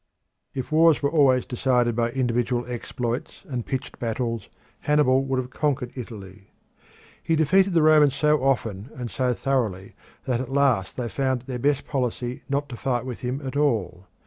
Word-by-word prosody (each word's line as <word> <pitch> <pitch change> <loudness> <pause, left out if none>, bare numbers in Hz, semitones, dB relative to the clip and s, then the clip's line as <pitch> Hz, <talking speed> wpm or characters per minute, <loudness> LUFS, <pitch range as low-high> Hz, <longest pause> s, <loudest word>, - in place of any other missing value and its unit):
If 130 +2 -4
wars 160 -1 +5
were 140 - +2
always 135 -6 +4
decided 125 -2 +1
by 115 0 +1
individual 120 -1 0
exploits 120 0 -4
and 125 -4 -4
pitched 130 -2 -4
battles, 115 -2 -3 0.3
Hannibal 145 -3 +3
would 135 -1 -1
have 125 0 -3
conquered 135 -4 -1
Italy. 105 -5 -9 0.7
He 165 - +1
defeated 185 +5 +3
the 165 - +5
Romans 150 -3 +5
so 150 0 +2
often 115 -5 0
and 125 -4 -5
so 125 -2 0
thoroughly 110 -8 -1 0.3
that 125 -3 0
at 130 - -6
last 135 -8 +1
they 125 -2 -2
found 130 0 -1
it - - -21
their 125 -2 -4
best 145 +2 +1
policy 125 -2 -2
not 140 +1 0
to 125 - -6
fight 125 -1 -1
with 125 -2 -5
him 130 +2 -4
at 130 - -5
all. 105 -11 0
130 Hz, 170 wpm, -24 LUFS, 120-140 Hz, 0.7 s, wars